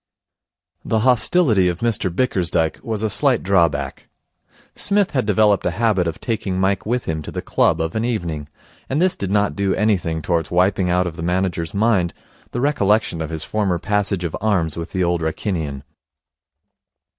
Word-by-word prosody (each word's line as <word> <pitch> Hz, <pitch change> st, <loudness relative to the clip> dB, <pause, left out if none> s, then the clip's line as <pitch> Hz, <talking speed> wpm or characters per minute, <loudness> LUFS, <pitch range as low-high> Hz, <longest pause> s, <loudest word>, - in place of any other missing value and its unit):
The 110 Hz, -1 st, 0 dB
hostility 120 Hz, -, +4 dB
of 90 Hz, 0 st, -4 dB
Mr 115 Hz, -5 st, 0 dB
Bickersdyke 85 Hz, -6 st, 0 dB
was 110 Hz, -2 st, -2 dB
a -, -, +2 dB
slight 130 Hz, +3 st, +2 dB
drawback. 85 Hz, -8 st, 0 dB, 0.7 s
Psmith 200 Hz, -1 st, +1 dB
had 130 Hz, -6 st, -1 dB
developed 105 Hz, -1 st, +3 dB
a -, -, +1 dB
habit 105 Hz, -6 st, +2 dB
of 80 Hz, -, -4 dB
taking 105 Hz, -5 st, -2 dB
Mike 95 Hz, +1 st, 0 dB
with 120 Hz, +1 st, -1 dB
him 80 Hz, -1 st, -2 dB
to -, -, -8 dB
the -, -, -5 dB
club -, -, +2 dB
of 80 Hz, 0 st, -2 dB
an 110 Hz, -, 0 dB
evening; 85 Hz, -11 st, -3 dB, 0.4 s
and 135 Hz, -, 0 dB
this 185 Hz, +1 st, +2 dB
did 100 Hz, -, -4 dB
not 105 Hz, 0 st, +1 dB
do 100 Hz, -1 st, 0 dB
anything 90 Hz, -6 st, 0 dB
towards 85 Hz, -3 st, 0 dB
wiping 90 Hz, +1 st, +2 dB
out 90 Hz, +1 st, +2 dB
of 85 Hz, -2 st, -5 dB
the -, -, -6 dB
manager's 90 Hz, 0 st, -1 dB
mind 100 Hz, -5 st, +1 dB, 0.3 s
the 120 Hz, -, -3 dB
recollection 105 Hz, -, +1 dB
of 80 Hz, -, -3 dB
his 80 Hz, -1 st, -3 dB
former 100 Hz, -5 st, 0 dB
passage 100 Hz, 0 st, -1 dB
of 85 Hz, -, -3 dB
arms 95 Hz, -8 st, +1 dB
with 85 Hz, 0 st, -6 dB
the 95 Hz, -, 0 dB
Old 85 Hz, -1 st, 0 dB
Wrykinian. 80 Hz, -4 st, -3 dB
95 Hz, 175 wpm, -20 LUFS, 85-110 Hz, 0.7 s, hostility